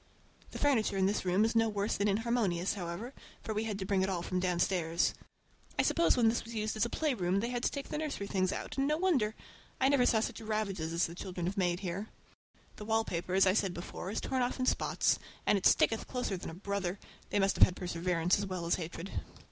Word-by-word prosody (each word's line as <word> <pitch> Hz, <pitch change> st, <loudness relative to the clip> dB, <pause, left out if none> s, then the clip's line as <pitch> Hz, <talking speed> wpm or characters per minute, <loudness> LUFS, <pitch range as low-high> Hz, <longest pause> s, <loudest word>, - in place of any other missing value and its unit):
The -, -, -7 dB
furniture 235 Hz, -8 st, +2 dB
in 190 Hz, -, +3 dB
this 200 Hz, 0 st, 0 dB
room 185 Hz, +4 st, +3 dB
is 225 Hz, -, -1 dB
no 225 Hz, 0 st, +4 dB
worse 205 Hz, 0 st, -1 dB
than 200 Hz, -, +1 dB
inharmonious, 205 Hz, -4 st, +1 dB
however, 190 Hz, +6 st, -5 dB, 0.3 s
for 220 Hz, -, -3 dB
we 215 Hz, +1 st, -1 dB
had 210 Hz, -3 st, -2 dB
to 190 Hz, -, -4 dB
bring 195 Hz, -1 st, +1 dB
it 190 Hz, -, +1 dB
all 175 Hz, -3 st, -2 dB
from 185 Hz, +1 st, -1 dB
downstairs. 175 Hz, -2 st, +1 dB, 0.6 s
I -, -, +4 dB
suppose 335 Hz, -, +3 dB
when 235 Hz, -2 st, +4 dB
this 225 Hz, +1 st, +1 dB
was 230 Hz, 0 st, -9 dB
used 215 Hz, 0 st, -1 dB
as 215 Hz, -, +2 dB
a -, -, -10 dB
playroom 200 Hz, -, 0 dB
they 235 Hz, +4 st, -1 dB
had 245 Hz, -1 st, -2 dB
to -, -, +2 dB
take 280 Hz, -1 st, -6 dB
the 300 Hz, -, -2 dB
nursery 295 Hz, -10 st, -3 dB
things 190 Hz, -2 st, 0 dB
out, -, -, -4 dB
and 275 Hz, -, +2 dB
no 305 Hz, +1 st, +2 dB
wonder! 275 Hz, -, +1 dB, 0.4 s
I 265 Hz, -, +4 dB
never 270 Hz, -3 st, +4 dB
saw 225 Hz, -, +4 dB
such 230 Hz, +1 st, -3 dB
ravages 205 Hz, -7 st, -2 dB
as 170 Hz, +1 st, +2 dB
the 165 Hz, -, -6 dB
children 180 Hz, -1 st, -5 dB
have 185 Hz, +3 st, -2 dB
made 180 Hz, -2 st, 0 dB
here. 195 Hz, +3 st, -4 dB, 0.7 s
The 210 Hz, -, -7 dB
wallpaper, 190 Hz, -5 st, 0 dB
as 195 Hz, -, +6 dB
I 185 Hz, -, +4 dB
said 195 Hz, -3 st, 0 dB
before, 175 Hz, +1 st, -6 dB
is 210 Hz, -, -2 dB
torn 260 Hz, -1 st, -1 dB
off 245 Hz, +2 st, -1 dB
in 255 Hz, -, +1 dB
spots, -, -, +2 dB, 0.3 s
and -, -, +4 dB
it 195 Hz, -, +4 dB
sticketh 225 Hz, -, +3 dB
closer 250 Hz, -6 st, -2 dB
than 180 Hz, -, -6 dB
a 165 Hz, -, -8 dB
brother—they 200 Hz, 0 st, -4 dB
must 195 Hz, -1 st, +2 dB
have -, -, +8 dB
had 180 Hz, -, +5 dB
perseverance 175 Hz, 0 st, 0 dB
as 200 Hz, -, -2 dB
well 185 Hz, -2 st, -4 dB
as 170 Hz, -, +2 dB
hatred. 170 Hz, +3 st, -6 dB
200 Hz, 235 wpm, -32 LUFS, 180-225 Hz, 0.7 s, have